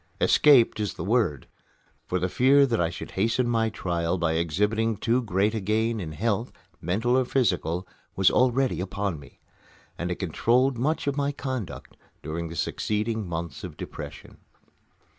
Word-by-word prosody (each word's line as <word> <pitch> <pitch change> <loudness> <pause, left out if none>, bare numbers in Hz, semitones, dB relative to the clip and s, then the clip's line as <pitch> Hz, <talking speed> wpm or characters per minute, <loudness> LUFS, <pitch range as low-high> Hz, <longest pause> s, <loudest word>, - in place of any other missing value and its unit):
"Escaped" 135 -8 +5
is 105 -2 -2
the - - -5
word; 95 - +1 0.6
for 90 - 0
the 90 0 0
fear 135 +7 +5
that 115 -7 0
I 80 - +1
should 85 - -8
hasten 115 +5 +1
my 115 -2 +1
trial 85 -3 -2
by 85 -2 0
exhibiting 105 +7 0
too 120 +5 +1
great 105 -1 +1
a 110 - -1
gain 110 +3 0
in 80 -5 -5
health, 115 +6 -1 0.3
mental 110 +9 +1
or 130 - +4
physical, 90 -9 0 0.3
was 95 -1 +4
already 125 -6 +2
upon 95 -3 -3
me; 70 - -16 0.6
and 90 - -2
it 90 - -1
controlled 120 - +1
much 155 +6 0
of 140 0 -1
my 140 0 +1
conduct 130 - -6 0.3
during 85 +2 -4
the 85 - -7
succeeding 110 +5 -2
months 85 -3 -5
of - - -8
depression. - - -9
105 Hz, 160 wpm, -26 LUFS, 90-120 Hz, 0.6 s, Escaped